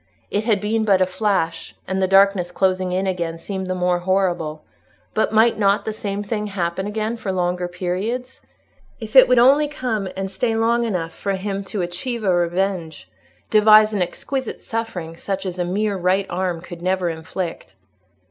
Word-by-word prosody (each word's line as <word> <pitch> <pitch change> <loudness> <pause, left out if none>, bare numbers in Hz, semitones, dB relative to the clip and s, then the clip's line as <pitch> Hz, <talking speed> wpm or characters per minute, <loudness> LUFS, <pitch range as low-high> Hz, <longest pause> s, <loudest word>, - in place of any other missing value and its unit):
It 205 +2 -1
had 215 -4 +2
been 220 +2 0
but 200 -3 +3
a 185 - +4
flash, 185 -4 -1
and 190 +1 -1
the 190 - +3
darkness 195 -2 +4
closing 185 0 +1
in 185 +2 0
again 170 -3 -2
seemed 190 +2 -5
the 185 - -2
more 180 -1 +1
horrible; 175 -4 -1 0.5
but 215 - +1
might 220 +1 +4
not 200 0 +2
the 220 - -2
same 205 -1 -4
thing 210 0 -3
happen 190 -1 -2
again 215 +2 -2
for 205 -3 -3
longer 180 -1 -1
periods? 200 +9 -4 0.6
If 220 0 -8
it 260 - +9
would 250 - +4
only 275 +5 +6
come 235 -9 -3
and 195 0 -3
stay 225 +3 -1
long 235 +1 +2
enough 175 -7 -2
for 200 - -3
him 195 +1 -3
to 195 -1 -3
achieve 215 +7 -4
a 190 -3 +3
revenge—devise 180 - +2
an 200 - 0
exquisite 260 +8 -3
suffering, 205 -8 -5
such 195 +3 -4
as 185 -1 -4
a 175 - 0
mere 200 +3 -1
right 185 +2 +1
arm 180 -2 -2
could 175 -1 -10
never 185 0 0
inflict! 165 +1 -5
190 Hz, 175 wpm, -21 LUFS, 180-215 Hz, 0.6 s, it